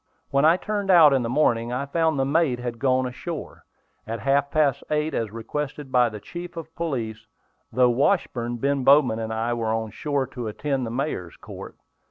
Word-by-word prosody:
When 140 +2 +3
I 165 +3 +6
turned 205 0 -3
out 165 -6 +8
in 135 - +2
the 115 - -2
morning, 120 -4 +1
I 130 +3 -2
found 160 +1 +1
the 135 - +1
mate 145 -2 +2
had 120 -1 -5
gone 130 0 +2
ashore. 150 +6 -7 0.4
At 115 +1 -4
half 140 +1 +2
past 140 -2 +1
eight, 150 +1 0
as 115 -2 -1
requested 135 +5 -5
by 125 -2 +4
the 105 -1 -8
chief 175 - -8
of 160 -1 -8
police 115 -9 -4 0.4
through 125 -1 +4
Washburn, 120 -4 0
Ben 140 +2 0
Bowman 135 -5 +5
and 110 0 -4
I 115 +2 -1
went 115 -2 -2
on 110 -1 -3
shore 140 +4 -1
to 120 -3 -6
attend 135 +3 -2
the - - -4
mayor's 115 - -3
court. - - -10
135 Hz, 195 wpm, -24 LUFS, 115-150 Hz, 0.4 s, out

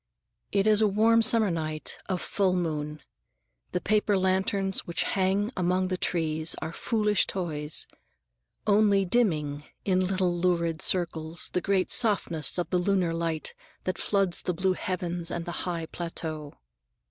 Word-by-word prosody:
It 200 0 +1
is 215 0 +4
a 215 - +5
warm 225 +3 +4
summer 220 -3 +4
night 155 -2 -4
of 185 -2 -1
full 195 -3 +1
moon. 150 -3 -3 0.7
The 180 - -1
paper 210 +1 +1
lanterns 190 +1 +2
which 170 - -1
hang 195 +3 0
among 185 +1 0
the 185 - 0
trees 160 -2 0
are 165 - -5
foolish 210 -1 +1
toys, 155 -5 -1 0.8
only 205 -2 +3
dimming, 155 -9 0 0.2
in 185 -1 +2
little 185 -2 0
lurid 170 -2 0
circles, 170 -2 +1
the 180 - 0
great 195 -1 0
softness 170 - +2
of 175 - -2
the 180 - +2
lunar 180 -2 +1
light 165 -2 -3 0.3
that 185 -2 -3
floods 195 -4 +1
the 180 - -2
blue 185 +2 +1
heavens 175 -2 -3
and 170 -1 -4
the 175 +1 -1
high 170 -2 -3
plateau. 160 -3 -6
180 Hz, 145 wpm, -27 LUFS, 165-195 Hz, 0.8 s, a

